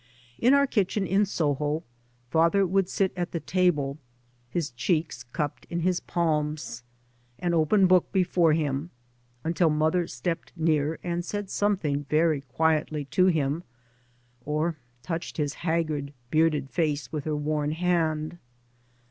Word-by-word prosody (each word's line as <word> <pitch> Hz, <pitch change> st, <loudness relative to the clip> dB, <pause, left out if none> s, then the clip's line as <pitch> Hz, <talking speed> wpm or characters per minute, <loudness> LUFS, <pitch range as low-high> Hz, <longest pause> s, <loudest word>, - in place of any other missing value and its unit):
In 255 Hz, +4 st, +5 dB
our 280 Hz, 0 st, +5 dB
kitchen 205 Hz, -5 st, 0 dB
in 195 Hz, +3 st, +2 dB
Soho 150 Hz, -2 st, 0 dB, 0.5 s
father 170 Hz, +5 st, +4 dB
would 190 Hz, 0 st, +1 dB
sit 195 Hz, -2 st, 0 dB
at 175 Hz, -1 st, -3 dB
the 170 Hz, -, -1 dB
table, 155 Hz, -5 st, +1 dB, 0.5 s
his 155 Hz, -1 st, -2 dB
cheeks 155 Hz, +1 st, -1 dB
cupped 145 Hz, +4 st, -4 dB
in 170 Hz, 0 st, -2 dB
his 180 Hz, +1 st, +1 dB
pakns, 150 Hz, -6 st, -1 dB, 0.6 s
an 175 Hz, -1 st, -1 dB
open 170 Hz, +5 st, +4 dB
book 185 Hz, -1 st, +4 dB
before 180 Hz, -4 st, +3 dB
him, 150 Hz, 0 st, -1 dB, 0.5 s
until 165 Hz, 0 st, +2 dB
mother 160 Hz, +3 st, +1 dB
stepped 165 Hz, +8 st, -4 dB
near 155 Hz, -1 st, +1 dB
and 175 Hz, 0 st, -2 dB
said 205 Hz, +1 st, -4 dB
something 155 Hz, -9 st, 0 dB
very 155 Hz, -2 st, +3 dB
quietly 150 Hz, +2 st, 0 dB
to 185 Hz, 0 st, +5 dB
him, 155 Hz, -2 st, +1 dB, 0.8 s
or 155 Hz, +3 st, -1 dB, 0.3 s
touched 165 Hz, +2 st, -4 dB
his 145 Hz, -2 st, 0 dB
haggard, 155 Hz, -4 st, -1 dB, 0.2 s
bearded 155 Hz, -4 st, +2 dB
face 150 Hz, +1 st, -1 dB
with 150 Hz, -3 st, -4 dB
her 155 Hz, -1 st, -1 dB
worn 150 Hz, 0 st, -1 dB
hand. 165 Hz, -1 st, 0 dB
160 Hz, 135 wpm, -27 LUFS, 150-180 Hz, 0.8 s, In